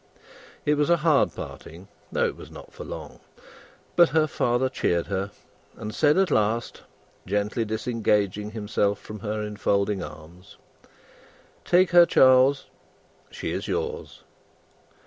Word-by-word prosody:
It 150 0 +2
was 150 +1 +1
a 170 - +5
hard 155 -4 +4
parting, 90 +4 -9 0.2
though - - +1
it - - -2
was - - -12
not - - -13
for - - -9
long. - - -9 0.8
But 175 -1 +6
her 155 0 +3
father 125 -3 0
cheered 85 -9 -1
her, 100 0 -3 0.5
and 105 0 -6
said 150 +5 +3
at 190 -1 +2
last, 110 +2 0 0.5
gently 105 +4 -1
disengaging 105 -2 -1
himself 105 -2 -1
from 105 +1 -10
her 105 +1 -3
enfolding 100 -1 -1
arms, 80 +5 -11 1.1
"Take 180 +1 +3
her, 175 -1 +7
Charles! 130 +2 +5 0.6
She - - -5
is - - -4
yours!" 465 0 -4
110 Hz, 130 wpm, -25 LUFS, 100-145 Hz, 1.1 s, her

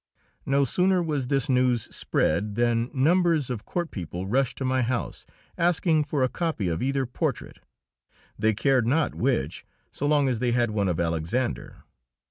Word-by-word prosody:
No 140 +1 +3
sooner 180 +6 +2
was 145 -6 -2
this 135 +3 0
news 125 -3 +2
spread 100 +6 0
than 120 0 +1
numbers 160 0 +2
of 115 -4 -5
court 175 -2 -3
people 90 -1 -5
rushed 125 +4 0
to 135 - -3
my 130 0 +1
house, 120 0 -3 0.3
asking 165 -2 +2
for 145 -2 0
a - - +4
copy 155 - -2
of 80 - -2
either 135 +1 0
portrait, 125 - -3 0.8
they 110 -1 +1
cared 130 0 +2
not 150 +5 +1
which, 115 - -1 0.3
so 145 - -3
long 145 -2 +3
as 125 -4 0
they 120 -1 +1
had 120 -2 +1
one 100 -2 0
of 85 - -1
Alexander. 85 +9 -2
130 Hz, 165 wpm, -26 LUFS, 115-145 Hz, 0.8 s, a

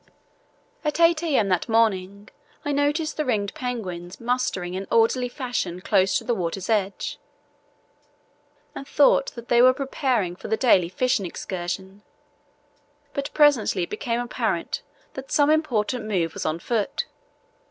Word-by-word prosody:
At 300 +1 -1
8 335 -1 +5
a.m. 275 -12 +1
that 180 +2 0
morning 200 -3 +1 0.4
I 290 - 0
noticed 295 +3 0
the 305 - +1
ringed 210 -7 -1
penguins 185 -8 -5
mustering 230 -7 -1
in 190 +1 -4
orderly 230 +2 +3
fashion 245 - -3
close 190 0 +2
to - - -5
the 240 +1 0
water's 185 +1 -3
edge, 200 -2 -1 1.5
and 275 - -8
thought 280 -1 +4
that 235 -1 -9
they 240 0 +5
were 255 +1 +6
preparing 260 - -1
for - - -9
the 220 - 0
daily 190 -8 +4
fishing 210 -1 0
excursion; 190 +3 -5 1.1
but 280 0 -3
presently 270 - +4
it - - -6
became 230 +2 -2
apparent 245 0 -2 0.3
that 265 0 -8
some 290 0 +4
important 250 -7 0
move 180 -6 -1
was - - -3
on 155 +1 -1
foot. 220 - -2
225 Hz, 140 wpm, -24 LUFS, 190-265 Hz, 1.5 s, were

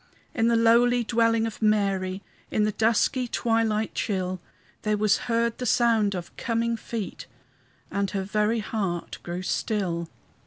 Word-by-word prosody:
In 225 -1 +2
the 235 - +3
lowly 235 +1 +4
dwelling 230 0 +2
of 225 -1 -6
Mary, 195 -3 +1 0.3
In 210 - +1
the 215 - +2
dusky 230 +4 +1
twilight 225 -2 0
chill, 185 -4 -2 0.4
There 215 -1 0
was 210 -1 +3
heard 230 0 +1
the 250 - -2
sound 220 -4 +3
of 175 -2 -7
coming 230 -1 0
feet, 225 - -6 0.6
And 200 0 0
her 195 -1 -2
very 210 +3 0
heart 195 -6 -3
grew 175 +1 -5
still. 175 -5 -1
215 Hz, 145 wpm, -26 LUFS, 195-230 Hz, 0.6 s, lowly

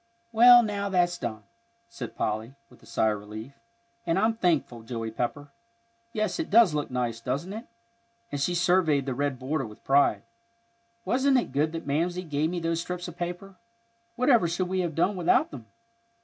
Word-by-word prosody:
"Well, 240 +1 +8
now 200 -2 -2
that's 175 -2 +1
done," 110 -3 -5 0.4
said 230 - -8
Polly, 110 +5 -3 0.2
with - - -19
a - - -18
sigh 110 - +1
of 105 - -3
relief; 110 +5 -9 0.5
"and 165 +1 0
I'm 220 +3 +2
thankful, 160 - 0
Joey 115 -1 -5
Pepper. 140 +5 -4 0.6
Yes, 215 +3 -2
it 330 - -2
does 215 -5 +6
look 150 -1 -2
nice, 120 -2 -2
doesn't 140 +10 -3
it?" 225 +3 -8 0.6
and 145 - -3
she 175 +5 0
surveyed 175 -5 +2
the 135 - -2
red 140 +1 -1
border 135 +1 -2
with 105 - -14
pride. 140 +1 +3 0.8
"Wasn't 265 +1 +3
it 245 - -1
good 150 +4 +1
that 165 - -5
Mamsie 170 +6 -1
gave 155 -1 -1
me 175 0 -3
those 165 0 -1
strips 180 0 -5
of 175 - -9
paper? 175 +2 -6 0.6
Whatever 245 -6 +4
should 180 +2 -2
we 190 0 -1
have 170 -4 -2
done 190 +5 +1
without 180 -2 +2
them! 120 -6 -10
165 Hz, 180 wpm, -27 LUFS, 135-190 Hz, 0.8 s, Well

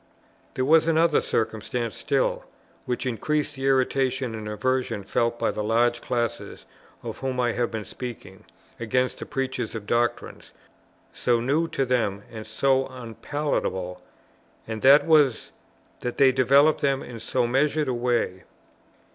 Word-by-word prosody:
There 130 - 0
was 160 +3 +5
another 165 -1 +3
circumstance 115 0 -2
still, - - 0 0.4
which 125 +1 -2
increased 150 +6 -1
the 135 -1 -3
irritation 130 -1 +1
and 110 -1 -6
aversion 120 0 -1
felt 115 +4 0
by - - 0
the 105 - -4
large 120 +2 +2
classes, 120 -4 -3 0.4
of - - -6
whom 130 -1 -3
I 120 -1 +2
have 120 0 -1
been 110 -2 -5
speaking, 115 -6 -9 0.3
against 125 +3 0
the - - -7
preachers 130 -4 -3
of 110 -2 -6
doctrines, 120 +2 -2 0.6
so 120 -1 +1
new 145 +8 +1
to 135 -4 -1
them 110 -6 0
and 110 -1 -8
so 135 +4 +1
unpalatable; 120 -7 -3 0.7
and 110 -1 -5
that 140 +3 +7
was, 150 -7 +3 0.5
that 125 - -4
they 135 -2 +6
developed 140 +4 +4
them 135 -1 +1
in 120 -2 -9
so 120 +3 0
measured 145 +4 +1
a 130 - 0
way. 120 -7 -1
125 Hz, 145 wpm, -25 LUFS, 115-135 Hz, 0.7 s, that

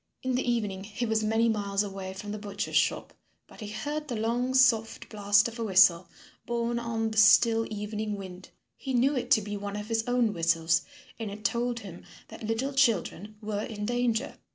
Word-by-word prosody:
In 260 0 -1
the 250 -1 0
evening 205 -5 -2
he 215 +4 -4
was 220 -1 0
many 225 +2 +2
miles 205 -2 0
away 195 -1 -6
from 205 +1 -7
the 210 - -5
butcher's 205 -1 -5
shop. - - +1 0.3
But - - -17
he 215 - -6
heard 290 +9 -4
the 245 - -3
long 240 +4 -1
soft 235 -4 +3
blast 205 0 +3
of 235 0 -9
a - - -1
whistle, 185 -4 +5 0.4
borne 235 0 -1
on 225 -1 -2
the 215 - +1
still 225 +2 +5
evening 210 0 -4
wind. 185 -2 -9 0.3
He 265 -1 -3
knew 270 +4 +3
it 255 - -3
to 220 - +5
be 205 0 -5
one 200 0 -5
of 210 +1 -6
his 225 -1 +1
own 245 -3 +2
whistles, 165 -1 +2 0.4
and 225 -2 -4
it 210 +2 -10
told 240 0 0
him 185 -4 -10 0.3
that - - -11
little 240 +5 -1
children 215 - 0
were 210 -1 -2
in 210 -3 -5
danger. 245 +1 -1
220 Hz, 200 wpm, -28 LUFS, 205-235 Hz, 0.4 s, whistle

